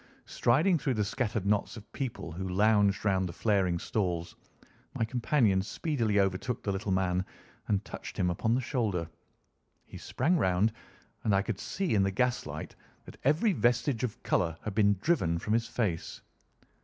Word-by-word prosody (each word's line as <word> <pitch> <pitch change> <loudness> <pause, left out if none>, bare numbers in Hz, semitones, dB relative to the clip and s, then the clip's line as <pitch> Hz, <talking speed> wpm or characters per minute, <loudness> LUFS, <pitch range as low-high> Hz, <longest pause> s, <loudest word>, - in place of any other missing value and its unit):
Striding 155 +9 +2
through 135 -2 0
the 105 - +1
scattered 110 -2 -2
knots 105 +3 0
of 110 - -13
people 125 - -4
who 95 +3 -4
lounged 105 +1 +3
round 95 -2 +2
the - - -7
flaring 95 -4 +1
stalls, 85 -3 -2 0.6
my 115 - +1
companion 115 -4 +2
speedily 115 - 0
overtook 95 +5 -1
the 100 - -1
little 95 +1 -2
man 95 -1 +1 0.4
and 105 0 0
touched - - -8
him 95 -3 +1
upon 110 +6 +1
the 130 - 0
shoulder. 110 - -1 0.8
He - - -10
sprang 165 +8 +1
round, 95 +3 +2 0.5
and 105 -3 +2
I 95 - +2
could 110 -3 -4
see 190 -7 -2
in 100 - +4
the 95 - +2
gas 125 +6 0
light - - -7 0.3
that - - -12
every 160 - +3
vestige 120 -2 +1
of 120 -4 -4
colour 85 -2 +1
had 105 - -4
been 100 -1 +4
driven 95 - +1
from 105 +6 -2
his 115 0 +1
face. 95 -11 -2
105 Hz, 170 wpm, -30 LUFS, 95-120 Hz, 0.8 s, in